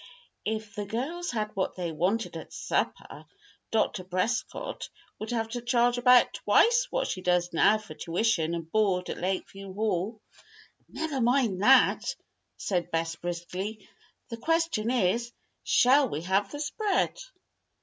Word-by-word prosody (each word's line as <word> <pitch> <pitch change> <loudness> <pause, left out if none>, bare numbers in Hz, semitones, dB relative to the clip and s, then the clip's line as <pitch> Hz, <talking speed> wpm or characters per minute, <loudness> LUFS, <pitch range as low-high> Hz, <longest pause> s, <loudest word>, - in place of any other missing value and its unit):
"If 215 -1 -3
the 205 0 -5
girls 300 - -3
had 215 -2 -3
what 190 - -1
they 175 -2 -3
wanted 185 +9 -1
at - - -8
supper, - - -3 0.4
Dr. 215 -4 0
Prescott 185 +6 -2 0.3
would 215 - -5
have 225 -2 -1
to 245 +1 -4
charge 245 0 +2
about 250 0 +6
twice 485 +2 +3
what - - -1
she 185 - -4
does 180 -1 +1
now 210 +6 +5
for 215 -7 -10
tuition 170 0 0
and 165 -1 -7
board 195 -4 +1
at - - -6
Lakeview 190 +1 -4
Hall." 210 0 -1 0.7
"Never 305 -5 -3
mind 235 -6 +2
that," 255 +4 +4 0.4
said 175 -3 -1
Bess, 165 0 -1
briskly. 180 +5 -5 0.4
"The 230 - -5
question 325 -5 0
is: 235 0 +1 0.3
Shall 265 +1 +4
we 150 - -3
have 195 +3 +1
the 290 - -6
spread?" 405 +10 0
215 Hz, 140 wpm, -28 LUFS, 180-245 Hz, 0.7 s, about